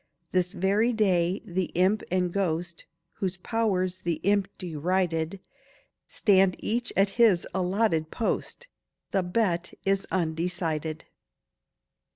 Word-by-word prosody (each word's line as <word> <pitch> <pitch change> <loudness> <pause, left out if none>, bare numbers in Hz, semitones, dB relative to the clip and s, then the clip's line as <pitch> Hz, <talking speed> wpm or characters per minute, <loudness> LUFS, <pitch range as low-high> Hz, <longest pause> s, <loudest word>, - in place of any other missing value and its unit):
This 180 -1 +1
very 205 +6 +2
day 185 -4 +1
the 185 +1 -1
imp, 190 +5 +3
and 180 -1 0
ghost, 170 -3 -2 0.3
Whose 190 -2 -2
powers 185 -3 0
the 170 -2 -1
imp 200 0 +2
derided, 175 +1 -1 0.7
Stand 195 -3 +3
each 235 +2 -2
at 195 +1 +4
his 200 -7 +5
allotted 185 -3 +1
post— 245 - -3 0.4
The 195 - +2
bet 180 -1 -1
is 195 0 +1
undecided. 165 -2 -2
185 Hz, 110 wpm, -27 LUFS, 170-200 Hz, 0.7 s, his